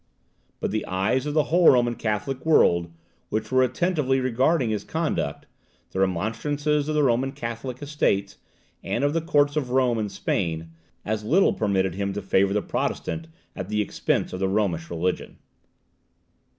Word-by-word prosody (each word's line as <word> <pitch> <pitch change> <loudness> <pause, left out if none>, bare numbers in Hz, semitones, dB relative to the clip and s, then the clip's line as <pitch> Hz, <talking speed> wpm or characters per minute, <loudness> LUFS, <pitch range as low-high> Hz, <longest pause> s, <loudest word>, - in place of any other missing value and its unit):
But - - -2
the 110 - -1
eyes 100 +9 0
of 150 - -3
the 155 - +4
whole 175 -1 +7
Roman 120 -2 +4
Catholic 120 +4 -3
world, 85 - +3 0.4
which 110 0 -2
were 130 0 +4
attentively 135 0 +1
regarding 130 +1 +1
his 105 - -2
conduct, - - -2 0.5
the 95 - -3
remonstrances 140 - 0
of 155 - 0
the 150 - +3
Roman 130 +1 +2
Catholic 125 0 -5
Estates, 100 -9 0 0.5
and - - -1
of 145 +1 +2
the 165 - +1
Courts 145 -3 +2
of 140 -5 -1
Rome 125 -2 +2
and 105 -2 -2
Spain, 80 -4 -2 0.3
as 110 0 -2
little 170 - +3
permitted 95 -4 0
him 100 +1 -2
to 105 - -4
favour 95 0 +2
the 105 - 0
Protestant 160 0 -3 0.3
at 95 0 -6
the 105 0 0
expense 105 - -1
of 90 - -4
the 95 - +1
Romish 95 -5 0
religion. 85 +2 -2
115 Hz, 165 wpm, -25 LUFS, 100-145 Hz, 0.5 s, whole